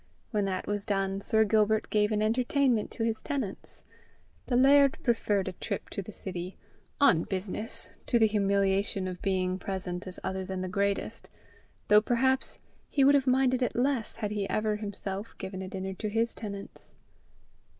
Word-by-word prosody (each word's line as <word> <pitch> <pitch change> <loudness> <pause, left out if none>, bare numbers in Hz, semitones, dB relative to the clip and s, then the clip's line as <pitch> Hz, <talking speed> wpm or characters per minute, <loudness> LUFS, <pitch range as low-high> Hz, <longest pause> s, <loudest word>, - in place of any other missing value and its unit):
When 210 -3 +1
that 185 -1 -2
was 205 -1 -2
done, 195 -2 -1
Sir 220 +2 +6
Gilbert 215 0 +2
gave 210 0 +2
an 215 0 +1
entertainment 245 +1 +1
to 225 - -4
his 225 -1 0
tenants. 265 -10 -5 0.6
The 245 - 0
laird 275 +2 +5
preferred 210 -5 +1
a - - -1
trip 180 - -5
to - - -3
the 195 - -9
city, 185 -2 -6 0.4
"on 195 - +5
business," 195 +4 -4
to 240 - +3
the 225 - +5
humiliation 200 -2 +1
of 180 -1 -6
being 185 -1 0
present 185 -1 -4
as 185 - -7
other 190 0 -2
than 185 0 -4
the 185 - -3
greatest; 200 +2 -2 0.6
though 210 0 +7
perhaps 260 +4 +1 0.3
he 280 - +2
would 280 +1 +6
have 275 -2 +3
minded 255 0 +3
it 245 - 0
less 250 -2 0
had 215 -2 -3
he 205 -2 -2
ever 215 0 0
himself 200 0 -5
given 190 0 -6
a 190 - -5
dinner 190 0 -4
to 210 +3 -4
his 230 +2 0
tenants. 200 -2 -8
210 Hz, 170 wpm, -29 LUFS, 190-230 Hz, 0.6 s, though